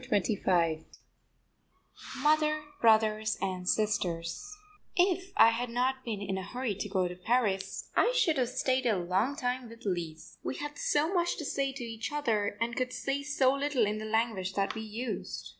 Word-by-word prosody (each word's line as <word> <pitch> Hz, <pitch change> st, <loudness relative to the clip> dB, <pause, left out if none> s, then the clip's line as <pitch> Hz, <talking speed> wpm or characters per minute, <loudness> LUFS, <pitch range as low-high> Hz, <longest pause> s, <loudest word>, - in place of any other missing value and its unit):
CHAPTER 255 Hz, -4 st, 0 dB, 0.2 s
XXV 165 Hz, -5 st, +1 dB, 1.4 s
MOTHER, 305 Hz, 0 st, +3 dB, 0.2 s
BROTHERS 215 Hz, -1 st, +4 dB
AND 185 Hz, -1 st, -2 dB
SISTERS 200 Hz, -, -1 dB, 0.4 s
If 370 Hz, +1 st, +2 dB
I 230 Hz, -, +8 dB
had 240 Hz, +2 st, -2 dB
not 255 Hz, +2 st, 0 dB
been 210 Hz, -4 st, -4 dB
in 190 Hz, -1 st, -2 dB
a -, -, -5 dB
hurry 245 Hz, +3 st, -3 dB
to 205 Hz, +1 st, -5 dB
get 185 Hz, -2 st, +1 dB
to 180 Hz, -, -7 dB
Paris 195 Hz, -1 st, 0 dB
I 485 Hz, -, +4 dB
should 350 Hz, -, +3 dB
have 245 Hz, -2 st, +1 dB
stayed 255 Hz, 0 st, +1 dB
a 215 Hz, -4 st, +3 dB
long 190 Hz, +10 st, 0 dB
time 250 Hz, -3 st, -2 dB
with 230 Hz, 0 st, -13 dB
Lise. 170 Hz, -3 st, -4 dB
We -, -, -3 dB
had 295 Hz, 0 st, -6 dB
so 310 Hz, +5 st, +1 dB
much 345 Hz, -2 st, +1 dB
to 305 Hz, -, -5 dB
say 275 Hz, -1 st, 0 dB
to 260 Hz, -2 st, -6 dB
each 225 Hz, +1 st, -5 dB
other 220 Hz, -9 st, 0 dB
and 235 Hz, +1 st, -1 dB
could 255 Hz, 0 st, -1 dB
say 275 Hz, +2 st, -2 dB
so 275 Hz, -2 st, +2 dB
little 275 Hz, -4 st, +1 dB
in 210 Hz, +1 st, -1 dB
the 215 Hz, -, -5 dB
language 215 Hz, -4 st, 0 dB
that 195 Hz, 0 st, 0 dB
we 220 Hz, -, -5 dB
used. 220 Hz, +3 st, -5 dB
230 Hz, 180 wpm, -30 LUFS, 200-275 Hz, 1.4 s, I